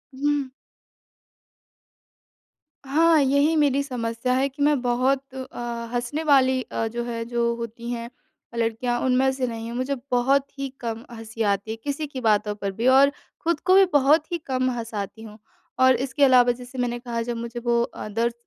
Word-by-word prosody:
हुँ। 285 0 0 2.4
हाँ, 320 +4 +4
यही 280 +4 +3
मेरी 280 -2 +3
समस्या 240 -1 -2
है 265 +2 +2
कि 280 +2 -10
मैं 290 -3 +3
बहुत 260 +2 0
अ, 260 -2 -8 0.3
हँसने 245 +6 -2
वाली 260 -3 +4
अ, 225 -2 -3
जो 235 +2 -4
है 230 -1 -3
जो 235 0 0
होती 235 0 -7
हैं 235 -1 -4 0.4
अ, - - -7
लड़कियाँ 230 +1 0
उनमें 260 +1 +3
से 260 -1 -2
नहीं 225 -1 -5
हूँ, 235 - -5
मुझे 260 +2 -1 0.2
बहुत 265 +3 +3
ही 275 0 -2
कम 230 -1 -4
हँसी 225 0 -8
आती 200 0 0
है, 225 - -5
किसी 290 +2 -3
की 270 -2 -7
बातों 210 -2 +2
पर 200 -1 -3
भी 225 +6 -1
और 270 +2 +6 0.3
खुद 335 -2 +1
को 370 - +5
भी 390 0 +7
बहुत 295 +4 +4
ही 345 - 0
कम 255 -1 0
हँसाती 220 -3 -5
हूँ। 215 -1 -11 0.4
और 260 0 +6
इसके 270 +4 -1
अलावा 250 -2 +6
जैसे 250 +2 -9
मैंने 245 -1 -1
कहा 235 -1 -4
जब 235 0 -3
मुझे 235 +1 -5
वो 235 0 +3
अ, - - -7
दर्द 230 +3 -1
250 Hz, 180 wpm, -24 LUFS, 230-275 Hz, 2.4 s, भी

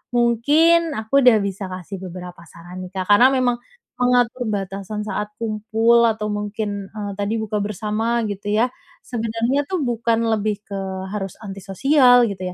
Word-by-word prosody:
mungkin 295 +8 +3
aku 220 +6 +1
udah 250 -4 +6
bisa 195 0 -4
kasih 185 +1 -7
beberapa 180 -1 -9
saran 175 +2 -11
nih, 185 -1 -8
Kak, 185 - -1
karena 205 +5 +7
memang 255 -2 +1 0.4
mengatur 245 0 +2
batasan 200 0 -4
saat 210 0 -4
kumpul 225 +2 +2
atau 215 -1 -1
mungkin, 205 -1 -3
eee, 205 -1 -4
tadi 205 +2 -1
buka 215 -1 -2
bersama, 215 +3 -1
gitu 200 0 -6
ya, 235 +4 +3 0.4
sebenarnya 230 +4 -1
tuh 370 +2 -2
bukan 230 -1 0
lebih 215 -2 0
ke 200 - -5 0.3
harus 195 -2 -4
anti 195 -3 -8
sosial, 250 - +5
gitu 185 -2 -5
215 Hz, 155 wpm, -21 LUFS, 200-240 Hz, 0.4 s, karena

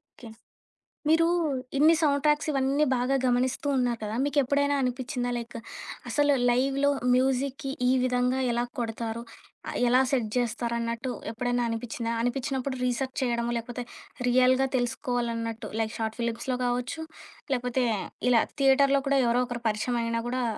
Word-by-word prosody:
Okay. 255 -6 -15 0.8
మీరు 330 +1 +5 0.5
ఇన్ని 315 +3 +6
soundtracks 295 +1 +2
ఇవన్నీ 275 +1 +2
బాగా 255 +3 +1
గమనిస్తూ 255 +3 +1
ఉన్నారు 240 -2 0
కదా! 210 0 -3
మీకెప్పుడైనా 285 0 +2
అనిపించిందా? 250 0 -2
లైక్ 235 0 -6 0.5
అసలు 290 -1 +3 0.2
లైవ్‌లో 275 +3 +2 0.2
మ్యూజిక్‌కి 265 +1 0 0.2
ఈ - - +4
విధంగా 250 +1 +1
ఎలా 240 +1 0
కొడతారు? 230 0 -3 0.5
ఆహ్, - - -4
ఎలా 250 +2 +5
సెట్ 245 -6 +1
జేస్తారు 235 -1 -1
అన్నట్టు 235 +2 -3 0.2
ఎప్పుడైనా 245 +1 -1
అనిపించిందా? 230 0 -3
అనిపించినప్పుడు 265 +2 -2
రీసెర్చ్ 255 +1 -1
చేయడమో, 235 -1 0
లేకపోతే 245 +1 -6 0.4
రియల్‌గా 255 +1 +4
తెలుసుకోవాలన్నట్టు 235 -2 -2
లైక్ 220 0 -1
షార్ట్ 220 +1 -3
ఫిలిమ్స్‌లో 235 +2 -2
గావచ్చు, 245 +6 -2 0.5
లేకపోతే 250 0 0 0.5
ఇలా 230 -2 +5 0.2
థియేటర్‌లో 275 +1 +5
కూడా 275 -1 +3
ఎవరో 240 +1 +3
ఒకరు 240 -1 -6
పరిచయమయినా 230 +1 -1
కూడా 255 0 -1
250 Hz, 130 wpm, -27 LUFS, 235-270 Hz, 0.8 s, ఇన్ని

